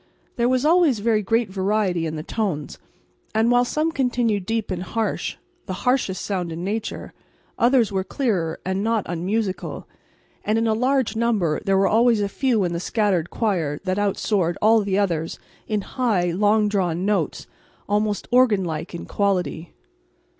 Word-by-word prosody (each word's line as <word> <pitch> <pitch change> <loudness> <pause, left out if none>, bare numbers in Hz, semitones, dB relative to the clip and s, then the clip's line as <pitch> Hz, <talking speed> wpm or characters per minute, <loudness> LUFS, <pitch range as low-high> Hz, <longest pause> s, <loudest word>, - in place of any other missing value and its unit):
There 240 0 +1
was 255 +2 +1
always 325 -6 +4
very 215 +1 +1
great 225 +1 0
variety 190 -3 0
in 160 - -4
the 155 - -5
tones; 175 -8 -3 0.6
and 225 +2 +3
while 245 0 +5
some 305 +6 0
continued 240 - 0
deep 225 -2 -1
and 180 -1 -2
harsh 220 +4 -2 0.3
the 190 - -3
harshest 250 -7 +1
sound 180 -4 -2
in 165 +2 -5
nature 215 +3 -4 0.5
others 240 -3 +4
were 190 -1 0
clearer 190 - -1
and 190 +2 -1
not 225 -2 0
unmusical; 190 +4 -3 0.6
and 215 +1 +1
in 225 - +1
a 220 - +2
large 255 0 +1
number 220 -9 +1
there 195 0 +3
were 195 - +3
always 230 +1 +4
a 205 - 0
few 230 0 +1
in 175 -1 -1
the 170 - -2
scattered 185 -3 0
choir 170 -10 -1
that 185 +1 -1
out 205 -1 0
soared 180 -5 0
all 220 +1 +5
the 200 -1 -1
others 170 -5 -1 0.3
in 210 -1 0
high, 200 -7 0
long 210 +4 +3
drawn 185 -3 0
notes, 205 -1 -1 0.4
almost 210 0 0
organ 240 -6 +4
like 165 +1 -4
in 170 - -6
quality. 185 -4 -1
205 Hz, 170 wpm, -23 LUFS, 185-230 Hz, 0.6 s, while